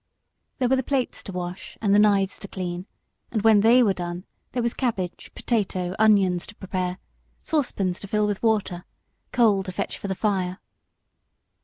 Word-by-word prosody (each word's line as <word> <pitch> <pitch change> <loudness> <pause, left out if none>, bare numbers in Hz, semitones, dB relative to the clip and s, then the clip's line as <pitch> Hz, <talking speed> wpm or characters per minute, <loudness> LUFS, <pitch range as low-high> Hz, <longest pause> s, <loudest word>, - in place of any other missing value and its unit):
There 255 - +1
were 265 - +4
the - - +2
plates 265 -1 -1
to 195 - -8
wash 180 0 -6
and 200 -3 +2
the 205 - +6
knives 200 -2 +3
to - - -8
clean, 180 -1 -5 0.4
and 215 -3 -2
when 220 -2 +6
they 240 +4 +6
were 205 -4 +3
done 175 +1 -5 0.3
there 245 - -1
were 235 - +2
potatoes, 225 -8 -3
cabbage, 190 -5 -1
onions 195 -5 +4
to 205 - -11
prepare, 185 -2 -3 0.5
saucepans 200 - 0
to 200 - -8
fill 210 +1 +1
with 205 -2 -2
water, 205 -6 0 0.5
coal 220 -5 +4
to 190 -1 -6
fetch - - -4
for - - -5
the 190 - -2
fire. 185 -3 -1
200 Hz, 175 wpm, -25 LUFS, 185-225 Hz, 0.5 s, the